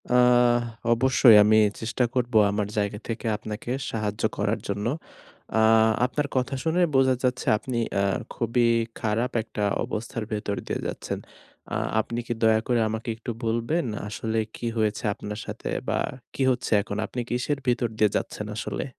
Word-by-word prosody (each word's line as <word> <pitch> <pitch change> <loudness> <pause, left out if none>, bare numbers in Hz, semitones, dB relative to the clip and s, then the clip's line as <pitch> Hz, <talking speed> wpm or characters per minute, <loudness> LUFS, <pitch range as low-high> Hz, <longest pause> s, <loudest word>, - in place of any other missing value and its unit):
আহ 125 -1 +5 0.3
অবশ্যই 120 -1 +6
আমি 110 +1 +5 0.2
চেষ্টা 120 +3 -1
করব 125 -1 -1 0.2
আমার 105 0 -1
জায়গা 105 0 -1
থেকে 115 +1 -4
আপনাকে 105 +3 -6 0.2
সাহায্য 105 -1 -3
করার 105 +2 0
জন্য। 100 +1 -2 0.7
আ - - +4 0.4
আপনার 145 +3 -1
কথা 130 +1 0
শুনে 165 +2 +1
বোঝা 130 -1 +4
যাচ্ছে 125 -1 0
আপনি 125 +2 -4 0.2
আ - - +2 0.3
খুবই 120 +1 +1 0.3
খারাপ 115 +3 0
একটা 110 -2 -4 0.2
অবস্থার 115 +1 -4
ভেতর 105 -1 -2
দিয়ে - - -2
যাচ্ছেন। - - -4 0.5
আ - - +1 0.2
আপনি 115 +2 -2
কি - - 0
দয়া 110 -1 +5
করে 120 -2 +2
আমাকে 110 +2 -4
একটু 115 +1 -5
বলবেন 115 +8 0 0.2
আসলে 110 +2 -3 0.2
কি - - -6
হয়েছে 110 +1 0
আপনার 105 +1 -6
সাথে - - -5 0.2
বা - - +1 0.4
কি - - -4
হচ্ছে 125 - -2
এখন? 100 0 -5
আপনি 125 - -6
কিসের 125 +4 -1
ভিতর 120 0 +2
দিয়ে 105 -1 +4
যাচ্ছেন 105 - -4
আসলে? - - -3
115 Hz, 160 wpm, -25 LUFS, 105-125 Hz, 0.7 s, অবশ্যই